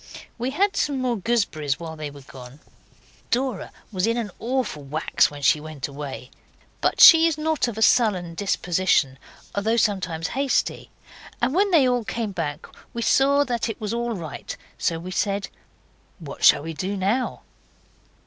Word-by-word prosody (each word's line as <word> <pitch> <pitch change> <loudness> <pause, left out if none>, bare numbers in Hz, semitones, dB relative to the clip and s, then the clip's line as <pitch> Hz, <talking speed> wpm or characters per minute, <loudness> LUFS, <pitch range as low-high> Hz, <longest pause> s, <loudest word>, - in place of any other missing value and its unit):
We 245 +2 -1
had 390 +8 +1
some 285 -2 0
more 250 -2 0
gooseberries 190 - -1
while 165 -1 -7
they 155 -1 -6
were 140 0 -12
gone. 130 +1 -12 0.7
Dora 250 -4 -1 0.2
was 190 0 0
in 230 +1 +1
an 220 -4 -3
awful 250 - -2
wax 145 +3 +1
when 145 -1 -10
she 150 - +4
went 155 -3 -6
away, 140 -2 -8 0.5
but - - 0
she 330 -3 +9
is 320 -2 -1
not 310 -3 0
of 230 -3 -5
a 220 - +2
sullen 190 -8 +3
disposition 175 -7 0 0.3
though 220 +3 0
sometimes 180 -7 0
hasty, 275 0 -1 0.5
and 260 - +1
when 400 +4 +3
they 310 -8 +4
all 245 -1 +1
came 225 -1 -3
back 160 -4 -4 0.3
we 235 - -2
saw 280 +3 +4
it 240 -5 -2
was 215 0 -3
all 235 -1 -2
right, 165 -5 -7 0.2
so 165 - -1
we 175 +3 -7
said 200 +1 -1 0.7
'What 160 -7 -9
shall 145 - +6
we 165 +1 -5
do 190 +5 -3
now? 205 +7 -1
200 Hz, 165 wpm, -23 LUFS, 160-245 Hz, 0.7 s, she